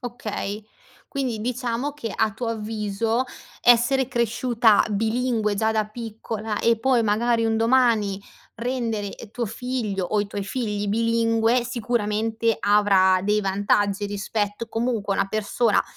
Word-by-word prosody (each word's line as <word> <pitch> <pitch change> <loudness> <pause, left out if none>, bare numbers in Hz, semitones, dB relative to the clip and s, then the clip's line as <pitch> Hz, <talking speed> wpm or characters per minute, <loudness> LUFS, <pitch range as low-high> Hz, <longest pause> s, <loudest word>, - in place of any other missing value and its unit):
Okay. 220 -4 -5 0.4
Quindi 255 -6 -2
diciamo 250 +3 -2
che, 235 -7 -6
a 220 -2 +1
tuo 230 +1 -4
avviso, 220 +2 -1 0.4
essere 245 +2 +4
cresciuta 235 -2 +3
bilingue 220 0 0
già 220 +2 +1
da 215 -1 0
piccola 220 -1 -5
e 230 -1 +3
poi 255 0 +2
magari 230 +2 +1
un 225 0 +1
domani 225 -4 +2 0.4
rendere, 230 -4 -2
ehm, 225 - -11
tuo 235 0 -3
figlio, 225 -4 -3
o 210 +3 0
i 205 - -2
tuoi 200 -1 -4
figli, 210 -2 -2
bilingue 230 +2 +2
sicuramente 225 -2 -1
avrà 195 -2 +4
dei 210 +1 +2
vantaggi, 200 +1 +1
rispetto 205 +2 -3
comunque 225 -3 -1
a - - -3
una - - 0
persona, 215 +2 +1
225 Hz, 135 wpm, -24 LUFS, 210-235 Hz, 0.4 s, essere